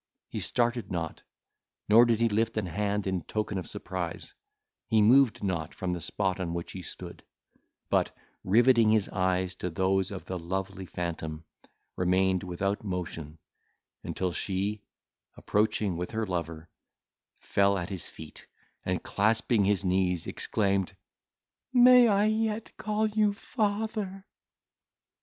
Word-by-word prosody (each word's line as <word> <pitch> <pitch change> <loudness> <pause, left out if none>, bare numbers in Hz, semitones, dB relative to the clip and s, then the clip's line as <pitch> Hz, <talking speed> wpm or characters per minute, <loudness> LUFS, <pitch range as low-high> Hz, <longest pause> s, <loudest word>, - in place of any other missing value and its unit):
He - - -4
started 120 -3 0
not, 85 -3 -3 0.7
nor 115 +3 +7
did 115 -2 +2
he 115 - +4
lift 110 +1 0
an 110 - 0
hand 100 +3 -1
in 95 -2 -1
token 105 -1 -3
of 90 - -7
surprise; 85 -3 -5 0.5
he 110 +1 +3
moved 120 +3 +5
not 85 -5 -2
from 90 -1 -2
the 90 - -4
spot 95 +2 -1
on 85 -2 -3
which 85 - -5
he 95 - -7
stood; - - -9 0.6
but, - - +2 0.3
riveting 115 +2 +5
his 110 -2 +2
eyes 95 0 0
to 90 - -3
those 95 +2 +1
of 100 -3 -7
the 95 -1 -4
lovely 95 +2 -4
phantom, 80 -3 -5 0.5
remained 95 0 +2
without 100 +3 -2
motion, 85 -5 -5 0.7
until 90 -1 -2
she, 100 +4 -2 0.6
approaching 105 -2 0
with 90 +1 -3
her 110 -1 -2
lover, 85 -3 -4 0.7
fell 100 0 +2
at 90 0 -4
his 95 -4 -6
feet, 80 -1 -11 0.4
and - - -2
clasping 110 0 +2
his 100 -1 +1
knees, 90 -2 +1
exclaimed, 100 -3 -1 0.8
"May 250 -1 +8
I 205 -1 +3
yet 220 0 -1
call 215 0 -1
you 210 -1 +2
father?" 205 -2 -2
100 Hz, 135 wpm, -29 LUFS, 90-115 Hz, 0.8 s, May